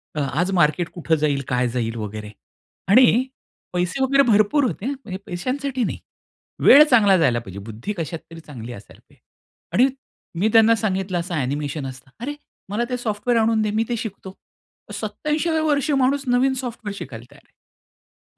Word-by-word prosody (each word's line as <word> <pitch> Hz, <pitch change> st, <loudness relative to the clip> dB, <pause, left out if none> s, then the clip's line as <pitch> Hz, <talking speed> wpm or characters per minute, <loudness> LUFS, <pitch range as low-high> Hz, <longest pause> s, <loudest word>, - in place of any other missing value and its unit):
अ, -, -, -2 dB
आज 175 Hz, +6 st, 0 dB
मार्केट 175 Hz, -1 st, +2 dB
कुठं 165 Hz, -2 st, 0 dB
जाईल? 145 Hz, -2 st, 0 dB
काय 125 Hz, 0 st, +1 dB
जाईल? 115 Hz, -1 st, -2 dB
वगैरे 105 Hz, -1 st, -6 dB, 0.6 s
आणि 245 Hz, +2 st, +6 dB, 0.5 s
पैसे 180 Hz, +9 st, -1 dB
वगैरे 275 Hz, +1 st, +4 dB
भरपूर 215 Hz, +7 st, +4 dB
होते 225 Hz, -3 st, -3 dB
हा. 270 Hz, -, 0 dB
म्हणजे 240 Hz, -9 st, -7 dB
पैशांसाठी 255 Hz, +8 st, -2 dB
नाही. -, -, -3 dB, 0.7 s
वेळ 290 Hz, -, +10 dB
चांगला 205 Hz, -6 st, +6 dB
जायला 130 Hz, -8 st, +2 dB
पाहिजे, 100 Hz, -4 st, -9 dB
बुद्धी 115 Hz, -, -6 dB
कशात 165 Hz, 0 st, -4 dB
तरी 165 Hz, -, -9 dB
चांगली 125 Hz, -7 st, -9 dB
असायला 105 Hz, -3 st, -13 dB
पाहिजे -, -, -25 dB, 0.5 s
आणि 250 Hz, +3 st, +5 dB, 0.5 s
मी 205 Hz, -, +3 dB
त्यांना 225 Hz, 0 st, +6 dB
सांगितलं, 190 Hz, -3 st, -1 dB
"असं 175 Hz, +1 st, -5 dB
ॲनिमेशन 145 Hz, +1 st, -2 dB
असतं." 130 Hz, 0 st, -11 dB
"अरे 280 Hz, +5 st, -4 dB, 0.3 s
मला 210 Hz, +4 st, -1 dB
ते 250 Hz, -, -1 dB
सॉफ्टवेअर 235 Hz, 0 st, 0 dB
आणून 220 Hz, 0 st, +2 dB
दे 210 Hz, -1 st, 0 dB
मी 220 Hz, +2 st, +1 dB
ते 240 Hz, -, 0 dB
शिकतो." 195 Hz, -3 st, -7 dB, 0.6 s
87व्या 315 Hz, +1 st, -1 dB
वर्षी 295 Hz, -1 st, +1 dB
माणूस 275 Hz, +1 st, +2 dB
नवीन 250 Hz, +2 st, +3 dB
सॉफ्टवेअर 225 Hz, -4 st, -6 dB
शिकायला 120 Hz, -, -8 dB
तयार 145 Hz, -, -18 dB
आहे. -, -, -49 dB
200 Hz, 165 wpm, -22 LUFS, 145-245 Hz, 0.7 s, वेळ